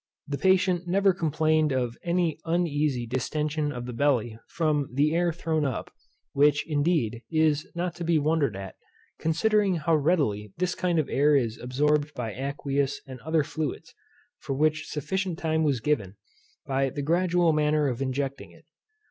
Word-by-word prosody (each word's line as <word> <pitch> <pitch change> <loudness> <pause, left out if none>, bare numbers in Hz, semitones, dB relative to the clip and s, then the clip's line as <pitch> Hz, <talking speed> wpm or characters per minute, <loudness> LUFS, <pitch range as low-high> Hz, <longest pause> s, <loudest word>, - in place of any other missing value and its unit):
The 140 -1 -3
patient 185 -2 +2
never 195 +2 +3
complained 155 -2 +1
of 125 -3 -1
any 170 -3 0
uneasy 150 -7 0
distention 150 +5 -2
of 120 -3 -6
the 125 - -6
belly 120 -4 +1
from 150 -4 0
the 145 +4 +2
air 175 +1 +2
thrown 160 -2 -1
up, 135 -4 -3 0.4
which, 145 +1 +3
indeed, 145 -7 0
is 155 -2 +2
not 175 0 -2
to 175 - -4
be 170 -1 +2
wondered 150 -6 +1
at, 95 -1 -8 0.4
considering 195 +4 +2
how 165 0 +1
readily 140 - 0
this 180 +1 0
kind 180 -2 0
of 155 - +1
air 145 +2 +3
is 115 -5 0
absorbed 150 +4 0
by 115 -4 -4
aqueous 140 +1 -2
and 130 -2 -9
other 160 +4 +1
fluids, 155 +1 -5 0.5
for 135 - -4
which 155 +2 +1
sufficient 185 +3 -2
time 160 -3 0
was 140 -5 +1
given, 110 -8 -1 0.5
by 135 0 0
the 145 +2 -5
gradual 175 +1 +2
manner 150 -1 +2
of 125 -1 -3
injecting 135 +1 -3
it. - - -20
150 Hz, 160 wpm, -26 LUFS, 135-165 Hz, 0.5 s, never